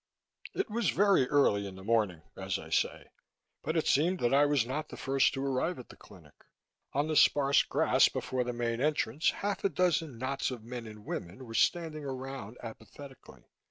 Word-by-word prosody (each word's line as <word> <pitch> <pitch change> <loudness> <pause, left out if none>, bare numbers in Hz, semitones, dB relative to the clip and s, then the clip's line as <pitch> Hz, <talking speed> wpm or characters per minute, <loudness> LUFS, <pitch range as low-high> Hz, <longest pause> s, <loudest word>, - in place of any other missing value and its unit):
It 390 - -1
was 235 +2 +1
very 195 -10 +3
early 105 -9 +3
in 95 - -9
the 95 - -11
morning, 105 -7 0
as - - -3
I - - -11
say, - - -1 0.5
but 160 +2 -2
it 160 - +1
seemed 175 +6 +2
that 120 +2 +2
I 145 +1 +5
was 145 -5 +2
not 150 +5 -4
the - - -9
first 135 0 +2
to 135 +1 -3
arrive 140 +6 -1
at 125 - -11
the - - -12
clinic. 85 -8 -17 0.6
On 145 +2 0
the 155 - -1
sparse 140 -1 +5
grass - - +3
before 130 -1 -2
the 125 - -3
main 120 0 -2
entrance, 150 -1 +1
half 205 0 -3
a 195 - +3
dozen 165 -6 0
knots 130 +3 -2
of 125 -4 -7
men 120 0 -7
and 105 -1 -12
women 95 +10 -6
were 115 - -9
standing 155 +6 +1
around 130 -4 -6
apathetically. 120 +4 -11
135 Hz, 195 wpm, -30 LUFS, 115-150 Hz, 0.6 s, I